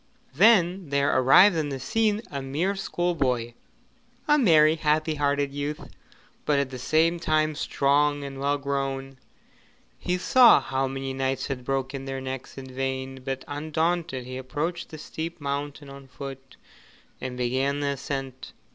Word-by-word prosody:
Then 185 Hz, -, +4 dB
there 140 Hz, 0 st, +1 dB
arrived 135 Hz, +10 st, +6 dB
on 155 Hz, -2 st, -1 dB
the 135 Hz, -1 st, -4 dB
scene 215 Hz, -, 0 dB
a 140 Hz, -1 st, -4 dB
mere 155 Hz, +9 st, -1 dB
schoolboy 140 Hz, -11 st, -1 dB, 0.7 s
a 295 Hz, 0 st, +5 dB
merry, 160 Hz, -, +5 dB
happy 155 Hz, 0 st, +1 dB
hearted 145 Hz, -1 st, 0 dB
youth, 145 Hz, +1 st, -5 dB, 0.5 s
but 150 Hz, -, +1 dB
at 140 Hz, -1 st, 0 dB
the 130 Hz, -, -7 dB
same 160 Hz, +6 st, +2 dB
time 155 Hz, -1 st, +1 dB
strong 145 Hz, 0 st, +1 dB
and 135 Hz, -1 st, -7 dB
well 140 Hz, +1 st, +1 dB
grown. 135 Hz, -1 st, -3 dB, 0.8 s
He 180 Hz, 0 st, -1 dB
saw 245 Hz, -, +6 dB
how 135 Hz, 0 st, -1 dB
many 135 Hz, 0 st, -4 dB
knights 135 Hz, 0 st, -1 dB
had 135 Hz, -3 st, -4 dB
broken 135 Hz, +1 st, -3 dB
their 135 Hz, 0 st, -4 dB
necks 130 Hz, 0 st, -7 dB
in 135 Hz, -, -7 dB
vain, 130 Hz, 0 st, -4 dB
but 135 Hz, 0 st, -4 dB
undaunted 155 Hz, -1 st, -2 dB
he 130 Hz, 0 st, -6 dB
approached 155 Hz, +6 st, -4 dB
the 155 Hz, -, -9 dB
steep 160 Hz, +2 st, -6 dB
mountain 145 Hz, 0 st, -4 dB
on 135 Hz, 0 st, -11 dB
foot 135 Hz, 0 st, -9 dB, 0.6 s
and 125 Hz, -1 st, -5 dB
began 130 Hz, +3 st, 0 dB
the 140 Hz, -, 0 dB
ascent. 135 Hz, -1 st, -5 dB
140 Hz, 150 wpm, -26 LUFS, 135-155 Hz, 0.8 s, arrived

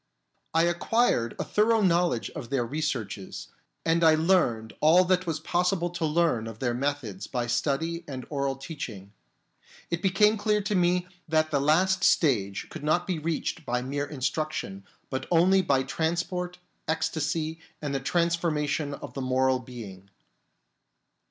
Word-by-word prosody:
I 165 Hz, -, +5 dB
acquired 175 Hz, -, +1 dB
a -, -, -1 dB
thorough 220 Hz, +1 st, +2 dB
knowledge 175 Hz, -, +2 dB
of 120 Hz, -, -7 dB
their 130 Hz, -3 st, 0 dB
researches, 120 Hz, -9 st, -4 dB, 0.4 s
and 165 Hz, +1 st, +2 dB
I 160 Hz, -1 st, +7 dB
learned 155 Hz, -10 st, +2 dB
all 170 Hz, +4 st, +6 dB
that 185 Hz, 0 st, +1 dB
was 160 Hz, -2 st, -1 dB
possible 175 Hz, +2 st, 0 dB
to 175 Hz, -2 st, -2 dB
learn 150 Hz, -8 st, +1 dB
of 115 Hz, -1 st, -8 dB
their 120 Hz, 0 st, -1 dB
methods 120 Hz, -7 st, -3 dB
by 125 Hz, -2 st, -2 dB
study 150 Hz, +7 st, -1 dB
and 130 Hz, -4 st, -6 dB
oral 140 Hz, -2 st, -1 dB
teaching. 125 Hz, -, -7 dB, 0.8 s
It 170 Hz, 0 st, -1 dB
became 210 Hz, +3 st, +4 dB
clear 210 Hz, 0 st, +1 dB
to 205 Hz, -, -1 dB
me 180 Hz, -1 st, +2 dB, 0.2 s
that 155 Hz, 0 st, +1 dB
the 140 Hz, -2 st, +2 dB
last 185 Hz, +6 st, +3 dB
stage 100 Hz, -, +2 dB
could -, -, -8 dB
not 175 Hz, +4 st, +2 dB
be 180 Hz, -4 st, -2 dB
reached 160 Hz, +1 st, -2 dB
by 125 Hz, -2 st, -1 dB
mere 145 Hz, +2 st, -2 dB
instruction, 135 Hz, -8 st, -3 dB, 0.3 s
but 130 Hz, -, -3 dB
only 180 Hz, +3 st, +5 dB
by 140 Hz, -6 st, +2 dB
trans 160 Hz, +5 st, 0 dB
port, 180 Hz, -1 st, -5 dB, 0.3 s
ecstasy, 160 Hz, 0 st, -1 dB, 0.2 s
and 145 Hz, -2 st, -3 dB
the 135 Hz, -, 0 dB
transformation 155 Hz, -2 st, 0 dB
of -, -, -9 dB
the 135 Hz, -, -4 dB
moral 130 Hz, 0 st, +2 dB
being. 105 Hz, -6 st, -10 dB
155 Hz, 150 wpm, -27 LUFS, 130-175 Hz, 0.8 s, I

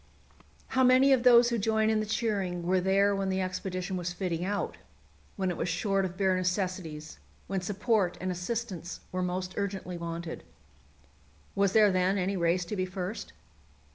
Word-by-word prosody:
How 260 Hz, -, +2 dB
many 260 Hz, +2 st, +6 dB
of 260 Hz, -, +3 dB
those 240 Hz, -1 st, +7 dB
who 235 Hz, -1 st, 0 dB
join 220 Hz, +1 st, +2 dB
in 220 Hz, -, +2 dB
the 215 Hz, -, -2 dB
cheering 200 Hz, -6 st, -1 dB
were 185 Hz, +1 st, +2 dB
there 195 Hz, +2 st, +3 dB
when 195 Hz, -1 st, -1 dB
the 190 Hz, 0 st, 0 dB
expedition 185 Hz, 0 st, -3 dB
was 175 Hz, 0 st, -3 dB
fitting 175 Hz, -2 st, -2 dB
out, 200 Hz, +2 st, -2 dB, 0.6 s
when 190 Hz, -3 st, -1 dB
it 175 Hz, -, -5 dB
was 175 Hz, -, -2 dB
short 195 Hz, +2 st, 0 dB
of 185 Hz, 0 st, -6 dB
bare 190 Hz, -2 st, +2 dB
necessities, 180 Hz, -4 st, -3 dB, 0.3 s
when 195 Hz, -1 st, -2 dB
support 205 Hz, 0 st, 0 dB
and 185 Hz, 0 st, -2 dB
assistance 180 Hz, -1 st, -4 dB
were 185 Hz, -, -2 dB
most 180 Hz, +1 st, -2 dB
urgently 190 Hz, -3 st, -3 dB
wanted? 170 Hz, 0 st, -5 dB, 1.1 s
Was 195 Hz, -1 st, +2 dB
there 215 Hz, -2 st, +6 dB
then 185 Hz, +2 st, +2 dB
any 195 Hz, +1 st, 0 dB
race 175 Hz, 0 st, +1 dB
to 210 Hz, -, -4 dB
be 185 Hz, -1 st, -1 dB
first? 185 Hz, +3 st, -5 dB
190 Hz, 170 wpm, -29 LUFS, 180-205 Hz, 1.1 s, those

